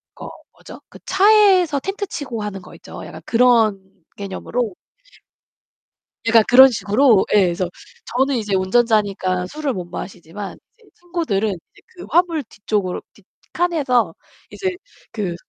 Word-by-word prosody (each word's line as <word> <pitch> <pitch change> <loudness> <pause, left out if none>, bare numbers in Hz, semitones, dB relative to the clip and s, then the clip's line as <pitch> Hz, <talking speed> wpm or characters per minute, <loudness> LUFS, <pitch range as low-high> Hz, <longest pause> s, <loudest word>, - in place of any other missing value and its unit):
그 - - -10
어 - - -7 0.2
뭐죠? - - -13
그 - - -14
차에서 380 -6 +4
텐트 390 +5 -4
치고 255 -10 -5
하는 200 -2 -5
거 - - -14
있죠. - - -11
약간 - - -10
그런 230 -4 +3 0.4
개념으로 200 +2 -4 1.5
약간 225 -1 +6
그런 260 +2 +9
식으로 225 -1 +3
예 210 - +6
그래서 175 0 -2 0.5
저는 270 +1 +2
이제 210 -4 -1
운전자니까 190 -3 +1
술을 295 +3 -3
못 180 -4 -5
마시지만 180 +2 -8 0.2
이제 445 -3 -24
친구들은 330 - -2
이제 180 -5 -10
그 355 - -10
화물 335 -2 +2
뒤쪽으로 205 -4 -3
뒤 205 - -22 0.3
칸에서 265 - +1 0.4
이제 380 - -2 0.4
그 200 -7 -3
230 Hz, 285 characters per minute, -20 LUFS, 195-300 Hz, 1.5 s, 그런